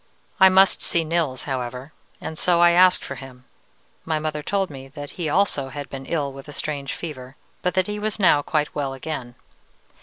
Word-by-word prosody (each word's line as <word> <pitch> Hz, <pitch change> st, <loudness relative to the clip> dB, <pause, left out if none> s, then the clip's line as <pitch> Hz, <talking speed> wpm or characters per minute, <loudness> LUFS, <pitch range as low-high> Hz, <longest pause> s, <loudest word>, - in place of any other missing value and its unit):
"I 190 Hz, -, +9 dB
must 190 Hz, +1 st, +5 dB
see 170 Hz, -, 0 dB
Nils, 155 Hz, -5 st, -1 dB
however, 130 Hz, +1 st, -4 dB, 0.3 s
and 160 Hz, -, -6 dB
so 170 Hz, +2 st, +3 dB
I 175 Hz, 0 st, +7 dB
asked 180 Hz, +1 st, +5 dB
for -, -, -5 dB
him. 130 Hz, -2 st, -11 dB, 0.6 s
My 160 Hz, -1 st, -1 dB
mother 155 Hz, -1 st, -3 dB
told 195 Hz, +2 st, -1 dB
me 135 Hz, -1 st, -9 dB
that 145 Hz, +1 st, -8 dB
he 170 Hz, -4 st, -3 dB
also 145 Hz, -6 st, +1 dB
had 140 Hz, +2 st, -7 dB
been 135 Hz, -1 st, -7 dB
ill 145 Hz, -5 st, -1 dB
with 135 Hz, +1 st, -11 dB
a 145 Hz, -, -8 dB
strange 140 Hz, -3 st, -3 dB
fever, 135 Hz, -5 st, -7 dB, 0.3 s
but 180 Hz, -, -1 dB
that 185 Hz, -1 st, +3 dB
he 210 Hz, +1 st, -4 dB
was 215 Hz, 0 st, -2 dB
now 180 Hz, -8 st, +5 dB
quite 150 Hz, 0 st, -1 dB
well 135 Hz, -2 st, -2 dB
again. 130 Hz, -3 st, -5 dB
150 Hz, 200 wpm, -23 LUFS, 135-175 Hz, 0.6 s, I